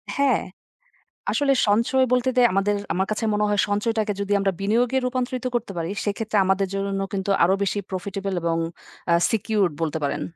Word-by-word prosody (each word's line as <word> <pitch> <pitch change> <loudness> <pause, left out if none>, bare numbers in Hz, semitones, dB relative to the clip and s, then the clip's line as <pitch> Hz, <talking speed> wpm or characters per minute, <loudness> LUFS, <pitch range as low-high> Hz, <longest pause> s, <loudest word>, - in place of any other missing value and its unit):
হ্যাঁ, 275 -4 +2 0.9
আসলে 280 -2 +2
সঞ্চয় 235 +5 +3
বলতে 250 +1 +2
দে - - +6
আমাদের 200 +1 +2 0.2
আমার 190 +1 0
কাছে 215 - -2
মনে 210 0 +1
হয় 205 -1 +1
সঞ্চয়টাকে 215 +1 0
যদি 200 0 -3
আমরা 195 -1 +1
বিনিয়োগে 235 +5 +2
রূপান্তরিত 255 0 -2
করতে 235 - -2
পারি 165 +1 -2 0.2
সেক্ষেত্রে 210 +1 -1
আমাদের 190 0 +1
জন্য 195 0 -2
কিন্তু 195 0 -2
আরো 185 +3 +4
বেশি 205 +1 -1
প্রফিটেবল 195 +1 -4
এবং 165 -1 0 0.5
আ - - +6 0.2
সিকিউরড 210 -5 +1
বলতে 160 0 -1
পারেন। 140 - -1
205 Hz, 170 wpm, -23 LUFS, 195-235 Hz, 0.9 s, দে